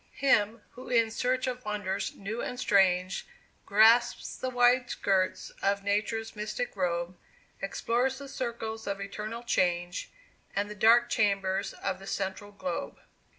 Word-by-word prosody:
Him, 225 -5 +2
who 255 - -11
in 230 -2 +3
search 255 +3 0
of 250 -1 -3
wonders 205 -3 -2
new 215 +4 -4
and 250 - -4
strange, 190 -4 +2 0.4
Grasps 225 +4 +4
the 255 - -3
wide 245 0 +4
skirts 190 -2 0
of 200 0 +1
Nature's 215 +3 -1
mystic 210 +3 -3
robe 175 -1 -1 0.5
Explores 245 +6 0
the 280 0 -8
circles 230 -4 -4
of 200 0 -2
eternal 215 +4 -5
change, 175 -5 0 0.5
And 205 +1 -1
the - - -4
dark 230 +3 +5
chambers 195 -2 +1
of 190 -1 -3
the 195 - -11
central 195 +1 -3
globe. 185 -4 -5
210 Hz, 140 wpm, -29 LUFS, 195-240 Hz, 0.5 s, dark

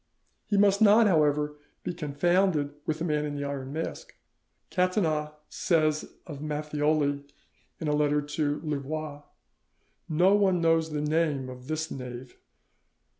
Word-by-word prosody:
He 205 - +1
must 200 0 +4
not, 220 +2 +7
however, 150 -4 +2 0.2
be - - -3
confounded 160 0 +1
with 155 - 0
the 165 - -3
Man 150 -2 0
in 145 -1 -3
the 145 - -3
Iron 140 -1 -4
Mask. 165 - -5 0.6
Catinat 175 -5 +1 0.2
says 155 -3 0
of 150 -4 -8
Matthioli 150 -1 0 0.6
in 160 - -3
a 150 - +2
letter 150 0 +2
to 145 0 -1
Louvois 150 0 -4 0.9
"No 175 +5 +4
one 195 -3 +3
knows 165 -1 +2
the 150 -1 -2
name 150 -3 0
of 125 0 -10
this 155 +1 -3
knave." 125 -1 -7
150 Hz, 135 wpm, -28 LUFS, 145-165 Hz, 0.9 s, not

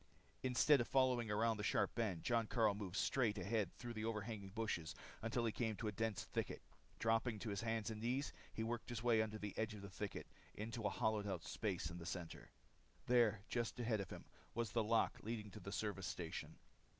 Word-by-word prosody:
Instead 130 +2 +5
of 120 - -1
following 130 -4 +3
around 110 +1 +3
the 105 - -3
sharp - - +2
bend, 105 -8 0
Jon 115 -2 +2
Karyl 110 -4 +4
moved 100 -3 -4
straight 115 -5 +2
ahead 100 0 +1
through 120 -1 -5
the 110 -1 -3
overhanging 110 -2 -2
bushes 100 -6 -2 0.3
until 115 +2 +1
he 115 - +2
came 110 -1 0
to 110 - -3
a - - +1
dense 110 -1 -1
thicket. - - -3 0.3
Dropping 115 0 +2
to 110 0 -3
his 100 - -1
hands 115 -1 0
and 110 -1 -5
knees 125 +5 0 0.2
he 110 - -2
worked 120 +1 -2
his 120 -1 -3
way 115 -2 +5
under 110 -1 -1
the 105 -2 -4
edge 110 0 0
of 100 - -8
the 100 - -7
thicket 100 +2 -4 0.3
into 115 +2 -3
a - - +2
hollowed 110 -3 +1
out 95 -5 -2
space 90 -6 -1
in 85 - -6
the 85 - -6
center. 90 -3 -5 0.6
There, 115 -4 +5
just 120 0 -1
ahead 115 -3 +1
of 95 - -3
him, - - -7 0.3
was 115 -2 0
the 115 - +2
lock 115 +1 +3
leading 110 -1 -3
into 105 +1 -9
the 100 +1 -6
service 100 -3 -1
station. 85 -2 -4
110 Hz, 210 wpm, -41 LUFS, 100-115 Hz, 0.6 s, Instead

